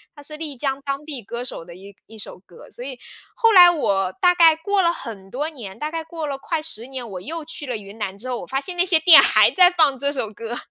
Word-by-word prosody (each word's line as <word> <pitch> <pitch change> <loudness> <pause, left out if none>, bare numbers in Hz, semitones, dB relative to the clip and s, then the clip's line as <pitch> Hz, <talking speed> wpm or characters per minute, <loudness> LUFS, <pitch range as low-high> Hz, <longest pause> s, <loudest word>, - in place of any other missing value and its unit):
他 290 - -14
是 305 +1 -7
丽 305 -4 -6
江 270 +1 -3
当 275 +1 -4
地 290 -5 -6
歌 235 +3 -6
手 250 - -6
的 170 0 -13
一 195 +2 -13
一 225 - -14
首 205 - -8
歌， 175 - -15
所 240 - -10
以 260 -1 -7 0.4
后 455 -2 +3
来 355 -2 +9
我 200 - 0
大 360 -2 +4
概 330 -2 +5
过 390 +5 0
了 340 -2 +2
很 210 - -9
多 280 +8 -3
年， 225 -11 -10
大 300 +1 -4
概 325 0 -4
过 320 0 -6
了 285 -2 -3
快 325 +3 -3
10 245 -7 -7
年， 260 -3 -7
我 190 -4 -8
又 320 - -6
去 305 -2 -9
了 245 -3 -3
云 205 +1 -12
南 195 -2 -4
之 235 +6 -9
后， 250 -1 -3
我 - - -10
发 270 - -1
现 355 +6 -6
那 350 - +2
些 360 -3 +3
店 320 +1 +9
还 - - +4
在 360 -1 +6
放 315 -6 +2
这 280 +2 -1
首 240 -7 -4
歌。 230 +3 -6
275 Hz, 285 characters per minute, -21 LUFS, 225-325 Hz, 0.4 s, 来